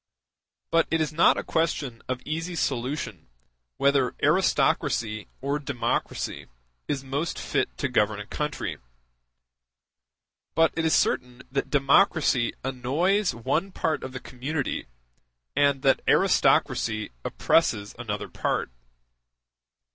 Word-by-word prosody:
It 160 Hz, -, +1 dB
is 155 Hz, -1 st, -1 dB
not 165 Hz, -, +5 dB
a -, -, -2 dB
question 145 Hz, -7 st, -1 dB
of 130 Hz, -1 st, -3 dB
easy 165 Hz, +3 st, -3 dB
solution 135 Hz, -, -2 dB, 0.5 s
whether 140 Hz, -3 st, +2 dB
aristocracy 115 Hz, -, +2 dB
or 140 Hz, +2 st, -1 dB
democracy 140 Hz, -4 st, -2 dB, 0.4 s
is 140 Hz, -2 st, -2 dB
most 140 Hz, +5 st, -2 dB
fit -, -, -1 dB
to 140 Hz, -, 0 dB
govern 105 Hz, -4 st, +1 dB
a 105 Hz, -, -6 dB
country. 150 Hz, +5 st, -3 dB, 1.8 s
But 165 Hz, 0 st, +4 dB
it 165 Hz, -, 0 dB
is 160 Hz, -, +4 dB
certain 125 Hz, 0 st, 0 dB
that 135 Hz, 0 st, -1 dB
democracy 140 Hz, -3 st, +3 dB
annoys 145 Hz, -, +1 dB
one 145 Hz, +11 st, -1 dB
part 160 Hz, -3 st, -1 dB
of 130 Hz, -, -5 dB
the 130 Hz, -, -6 dB
community, 130 Hz, -, -3 dB, 0.7 s
and 140 Hz, -1 st, +3 dB
that 135 Hz, -, +4 dB
aristocracy 110 Hz, -1 st, +3 dB
oppresses 105 Hz, -11 st, +1 dB
another 105 Hz, -4 st, -4 dB
part. -, -, -2 dB
135 Hz, 110 wpm, -26 LUFS, 125-155 Hz, 1.8 s, not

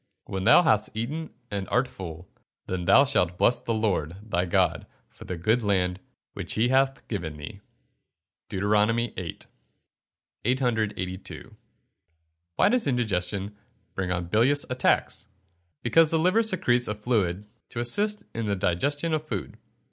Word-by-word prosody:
[Verse: -, -, -15 dB
"When 95 Hz, -1 st, -2 dB
thou 120 Hz, -, +7 dB
hast 110 Hz, -7 st, +1 dB
eaten 150 Hz, +8 st, -3 dB, 0.2 s
and 100 Hz, -2 st, -3 dB
art 125 Hz, +1 st, +2 dB
full, 90 Hz, -4 st, -9 dB, 0.4 s
then 90 Hz, -1 st, -3 dB
thou 115 Hz, +10 st, +6 dB
shalt 90 Hz, -10 st, +1 dB
bless 120 Hz, -, +3 dB
the 115 Hz, -, -2 dB
Lord 95 Hz, -7 st, 0 dB, 0.2 s
thy 90 Hz, +1 st, +1 dB
God 85 Hz, -, +1 dB, 0.2 s
for -, -, -13 dB
the 90 Hz, -, -4 dB
good 110 Hz, +8 st, +2 dB
land 95 Hz, -3 st, 0 dB, 0.3 s
which -, -, -6 dB
he 115 Hz, +3 st, +2 dB
hath 135 Hz, 0 st, +1 dB
given 85 Hz, -8 st, -4 dB
thee." 95 Hz, +8 st, -9 dB, 0.9 s
DEUT. 105 Hz, +3 st, +2 dB
VIII.] 105 Hz, -8 st, -3 dB, 1.1 s
882. 110 Hz, -7 st, -2 dB, 1.0 s
Why -, -, +4 dB
does 245 Hz, -9 st, +2 dB
indigestion 105 Hz, -5 st, -1 dB, 0.4 s
bring 95 Hz, -2 st, -2 dB
on 85 Hz, -1 st, -1 dB
bilious 120 Hz, +11 st, +3 dB
attacks? 125 Hz, -6 st, +1 dB, 0.6 s
Because 160 Hz, +6 st, +5 dB
the 165 Hz, -, +2 dB
liver 185 Hz, +7 st, +3 dB
secretes 175 Hz, -, +1 dB
a 105 Hz, -, -2 dB
fluid 105 Hz, -4 st, 0 dB, 0.2 s
to 120 Hz, -, -5 dB
assist 205 Hz, -, 0 dB
in 115 Hz, -1 st, -3 dB
the 100 Hz, -, +1 dB
digestion 140 Hz, -, 0 dB
of 155 Hz, 0 st, -2 dB
food. 100 Hz, -9 st, -4 dB
110 Hz, 145 wpm, -26 LUFS, 95-130 Hz, 1.1 s, thou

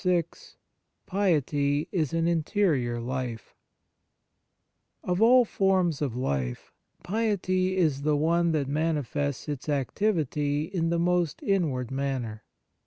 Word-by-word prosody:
VI 180 Hz, -2 st, +3 dB, 0.8 s
PIETY 150 Hz, -6 st, +1 dB
IS 160 Hz, -8 st, 0 dB
AN 165 Hz, 0 st, +1 dB
INTERIOR 160 Hz, -, +1 dB
LIFE 120 Hz, -2 st, -5 dB, 1.5 s
OF 180 Hz, +2 st, -1 dB
all 245 Hz, +2 st, +6 dB
forms 185 Hz, -7 st, +1 dB
of 135 Hz, -6 st, -1 dB
life, 65 Hz, -, -3 dB, 0.3 s
piety 185 Hz, -2 st, 0 dB
is 155 Hz, -6 st, +2 dB
the 150 Hz, 0 st, +1 dB
one 170 Hz, +3 st, +2 dB
that 150 Hz, -4 st, 0 dB
manifests 145 Hz, -2 st, -1 dB
its 145 Hz, 0 st, -5 dB
activity 145 Hz, -, 0 dB
in 165 Hz, 0 st, -2 dB
the 170 Hz, -, +1 dB
most 175 Hz, -2 st, 0 dB
inward 150 Hz, -, 0 dB
manner. 130 Hz, -5 st, -3 dB
155 Hz, 110 wpm, -27 LUFS, 140-180 Hz, 1.5 s, all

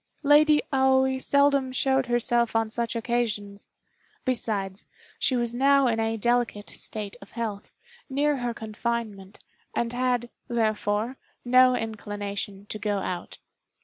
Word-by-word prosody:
Lady 295 Hz, +1 st, +5 dB
Aoi 265 Hz, 0 st, +3 dB
seldom 280 Hz, -1 st, +3 dB
showed 265 Hz, 0 st, +1 dB
herself 240 Hz, -1 st, +1 dB
on 225 Hz, -1 st, +1 dB
such 235 Hz, 0 st, -2 dB
occasions; 220 Hz, -4 st, -2 dB, 0.6 s
besides, 205 Hz, -6 st, -2 dB, 0.3 s
she 260 Hz, -, +2 dB
was 240 Hz, -1 st, 0 dB
now 275 Hz, +2 st, +4 dB
in 230 Hz, -2 st, +1 dB
a 225 Hz, 0 st, 0 dB
delicate 240 Hz, -2 st, 0 dB
state 210 Hz, -1 st, -5 dB
of -, -, -14 dB
health, 215 Hz, -4 st, -5 dB, 0.3 s
near 285 Hz, +2 st, +1 dB
her 245 Hz, -1 st, -2 dB
confinement, 220 Hz, -3 st, -4 dB, 0.4 s
and 235 Hz, 0 st, -1 dB
had, 245 Hz, -1 st, 0 dB, 0.2 s
therefore, 220 Hz, +1 st, 0 dB, 0.3 s
no 255 Hz, +1 st, +6 dB
inclination 205 Hz, -3 st, -5 dB
to 215 Hz, -, -6 dB
go 205 Hz, -1 st, -1 dB
out. 180 Hz, -2 st, -4 dB
235 Hz, 125 wpm, -26 LUFS, 210-255 Hz, 0.6 s, no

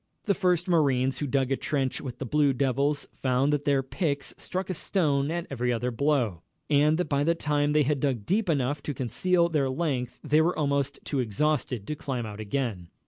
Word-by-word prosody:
The 200 Hz, -, +3 dB
first 180 Hz, -2 st, +1 dB
marines 135 Hz, -6 st, +2 dB
who 145 Hz, -, -2 dB
dug 135 Hz, 0 st, 0 dB
a -, -, +3 dB
trench 135 Hz, -2 st, -2 dB
with 130 Hz, -4 st, -6 dB
the 135 Hz, -, -5 dB
Blue 145 Hz, +1 st, +2 dB
Devils 140 Hz, +3 st, 0 dB
found 130 Hz, +2 st, +1 dB
that 145 Hz, 0 st, -1 dB
their 140 Hz, -2 st, +2 dB
picks 140 Hz, 0 st, -2 dB
struck 185 Hz, 0 st, -4 dB
a -, -, -1 dB
stone 150 Hz, -6 st, 0 dB
at 170 Hz, +1 st, -2 dB
every 125 Hz, -2 st, 0 dB
other 120 Hz, +1 st, -1 dB
blow, 120 Hz, -, 0 dB, 0.3 s
and 150 Hz, +2 st, +4 dB
that 180 Hz, -, -1 dB
by 145 Hz, -1 st, +1 dB
the 165 Hz, +3 st, +2 dB
time 150 Hz, -2 st, 0 dB
they 150 Hz, 0 st, +4 dB
had 145 Hz, 0 st, 0 dB
dug 130 Hz, -7 st, -1 dB
deep 200 Hz, 0 st, +1 dB
enough 140 Hz, -1 st, 0 dB
to 145 Hz, -, -4 dB
conceal 170 Hz, +8 st, +1 dB
their 150 Hz, -5 st, 0 dB
length 130 Hz, -4 st, -2 dB
they 155 Hz, +1 st, +3 dB
were 170 Hz, +3 st, +1 dB
almost 140 Hz, -2 st, 0 dB
too 140 Hz, -, -2 dB
exhausted 125 Hz, -1 st, 0 dB
to 150 Hz, -, -3 dB
climb 130 Hz, -5 st, -3 dB
out 105 Hz, -1 st, -7 dB
again. 110 Hz, -5 st, -3 dB
140 Hz, 205 wpm, -27 LUFS, 130-155 Hz, 0.3 s, and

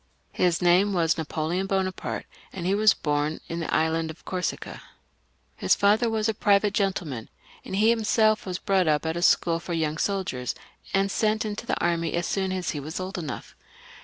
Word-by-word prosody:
His 180 Hz, -1 st, +1 dB
name 185 Hz, +4 st, +4 dB
was 165 Hz, -3 st, +2 dB
Napoleon 160 Hz, +3 st, -2 dB
Bonaparte, 190 Hz, -1 st, -2 dB, 0.3 s
and 180 Hz, -3 st, -6 dB
he 190 Hz, -, +2 dB
was 215 Hz, 0 st, +5 dB
bom 150 Hz, +1 st, -1 dB
in 165 Hz, -, -4 dB
the 165 Hz, -, -3 dB
island 160 Hz, 0 st, +1 dB
of 160 Hz, -, -11 dB
Corsica. 180 Hz, -1 st, -4 dB, 0.7 s
His -, -, +2 dB
father 215 Hz, +4 st, +3 dB
was 220 Hz, -1 st, 0 dB
a 220 Hz, -, +1 dB
private 205 Hz, -1 st, +3 dB
gentle 195 Hz, -4 st, 0 dB
man; 125 Hz, -7 st, -6 dB, 0.3 s
and -, -, -5 dB
he 220 Hz, +3 st, +5 dB
himseK 220 Hz, -1 st, +2 dB
was 180 Hz, -1 st, -2 dB
brought 190 Hz, -2 st, +1 dB
up 150 Hz, 0 st, +2 dB
at 160 Hz, 0 st, -1 dB
a 170 Hz, -, -2 dB
school 165 Hz, -1 st, +3 dB
for 170 Hz, -, -5 dB
young 160 Hz, -1 st, -1 dB
soldiers, 185 Hz, -11 st, -2 dB, 0.4 s
and 195 Hz, 0 st, +1 dB
sent 215 Hz, +1 st, +1 dB
into 215 Hz, +2 st, -5 dB
the -, -, 0 dB
army 170 Hz, -1 st, 0 dB
as 170 Hz, 0 st, 0 dB
soon 190 Hz, -1 st, -1 dB
as 185 Hz, -2 st, -2 dB
he 150 Hz, -, -4 dB
was 155 Hz, +6 st, -5 dB
old 185 Hz, 0 st, -4 dB
enough. 155 Hz, -5 st, -6 dB
185 Hz, 190 wpm, -26 LUFS, 165-200 Hz, 0.7 s, was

